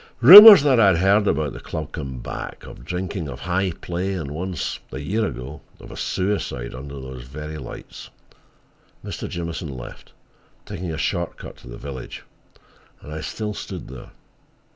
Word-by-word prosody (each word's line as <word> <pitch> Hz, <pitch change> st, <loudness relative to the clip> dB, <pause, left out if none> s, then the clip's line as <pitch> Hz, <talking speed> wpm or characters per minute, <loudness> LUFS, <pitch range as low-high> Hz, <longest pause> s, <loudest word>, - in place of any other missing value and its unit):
Rumors 200 Hz, -, +12 dB
that 135 Hz, -5 st, +3 dB
I 105 Hz, -, +6 dB
had 95 Hz, -4 st, +4 dB
heard 100 Hz, +3 st, +3 dB
about 75 Hz, -3 st, 0 dB
the -, -, -9 dB
club 75 Hz, -2 st, -7 dB
came 65 Hz, -5 st, -6 dB
back—of -, -, -8 dB
drinking, 90 Hz, +2 st, -4 dB
of 65 Hz, -, -9 dB
high 95 Hz, +2 st, -1 dB
play, 90 Hz, +3 st, -4 dB
and 80 Hz, -7 st, -5 dB
once, 90 Hz, +1 st, -4 dB
a -, -, -6 dB
year 100 Hz, +11 st, -2 dB
ago, 65 Hz, +5 st, -8 dB, 0.2 s
of -, -, -12 dB
a -, -, -9 dB
suicide 95 Hz, -10 st, -3 dB
under 70 Hz, +2 st, -9 dB
those 65 Hz, -1 st, -9 dB
very 75 Hz, +5 st, -8 dB
lights. 65 Hz, -, -10 dB, 1.0 s
Mr. -, -, -6 dB
Jamieson 85 Hz, -1 st, -5 dB
left, 65 Hz, -3 st, -10 dB, 0.5 s
taking 90 Hz, -4 st, -6 dB
a 80 Hz, -, -5 dB
short 85 Hz, +2 st, -3 dB
cut -, -, -11 dB
to -, -, -16 dB
the -, -, -9 dB
village, 70 Hz, -3 st, -8 dB, 0.8 s
and 75 Hz, -, -10 dB
I 80 Hz, -, -6 dB
still 105 Hz, +4 st, -5 dB
stood -, -, -8 dB
there. 65 Hz, -2 st, -11 dB
80 Hz, 165 wpm, -22 LUFS, 70-95 Hz, 1.0 s, Rumors